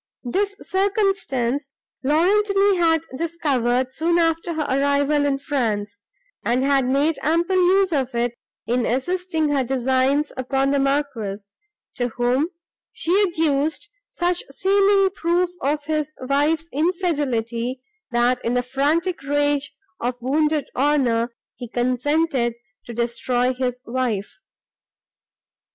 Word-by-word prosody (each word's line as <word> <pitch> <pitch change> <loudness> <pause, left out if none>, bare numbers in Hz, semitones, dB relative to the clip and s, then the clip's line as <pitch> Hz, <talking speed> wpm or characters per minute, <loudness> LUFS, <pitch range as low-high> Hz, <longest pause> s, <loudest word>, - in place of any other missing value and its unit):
This 395 +11 -1
circumstance 380 - 0 0.3
Laurentini 395 +6 +3
had 325 -2 +3
discovered, 260 -6 0
soon 335 +4 +1
after 330 0 +1
her 310 - 0
arrival 285 +1 +2
in 275 -1 +1
France, 230 -6 -2 0.4
and 245 +2 +1
had 275 -1 +3
made 285 +3 +1
ample 335 +5 +1
use 370 0 +3
of 265 -4 -1
it 235 0 0 0.3
in 245 +1 0
assisting 320 +4 -1
her 280 -2 +2
designs 265 +3 +1
upon 270 +1 0
the 280 - +2
Marquis, 270 -8 -1 0.5
to 245 - +1
whom 250 +5 +2 0.4
she 335 - -3
adduced 320 0 0 0.2
such 355 0 -1
seeming 390 +4 +3
proof 350 -1 0
of 290 +2 -1
his 305 -1 -1
wife's 290 +5 +1
infidelity, 265 -7 -1 0.3
that, 245 +1 +1
in 235 +2 0
the 250 - +1
frantic 295 +7 0
rage 290 0 0 0.3
of 245 +1 -1
wounded 300 +3 +1
honour, 255 -4 +2 0.3
he 245 - -7
consented 255 +1 0 0.3
to 240 - -6
destroy 245 +2 0
his 250 -1 -2
wife. 235 -5 -2
280 Hz, 115 wpm, -22 LUFS, 250-330 Hz, 0.5 s, Laurentini